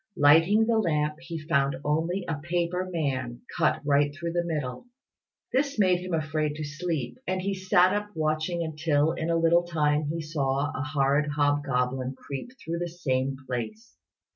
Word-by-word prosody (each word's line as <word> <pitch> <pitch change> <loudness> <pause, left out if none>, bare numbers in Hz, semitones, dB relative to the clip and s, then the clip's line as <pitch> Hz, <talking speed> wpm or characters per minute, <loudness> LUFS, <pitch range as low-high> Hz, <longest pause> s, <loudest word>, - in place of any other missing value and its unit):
Lighting 165 +9 +6
the 225 -1 +2
lamp, 150 -5 0
he 170 0 -6
found 140 -4 +1
only 165 +5 0
a 160 -3 -2
paper 175 +2 -1
man, 130 -7 -2
cut - - +1
right 145 0 +3
through 170 +3 -4
the 175 0 +1
middle. 150 - -4 0.7
This 275 +1 +1
made 185 -4 +4
him 180 -1 -2
afraid 155 -1 -1
to 155 - -5
sleep, 155 -3 -3
and 185 +1 0
he 195 +2 -1
sat 185 -1 +3
up 205 0 -2
watching, 155 +2 0
until 155 -1 +1
in 165 -1 -3
a 165 - +2
little 165 +1 +4
time 150 -3 +1
he 160 +3 -2
saw 145 -2 -1
a - - -2
horrid 145 0 +1
hobgoblin 135 -3 0
creep 140 - -7
through 170 -7 -4
the 175 0 -2
same 135 -5 -1
place. 215 - -5
155 Hz, 165 wpm, -27 LUFS, 145-175 Hz, 0.7 s, Lighting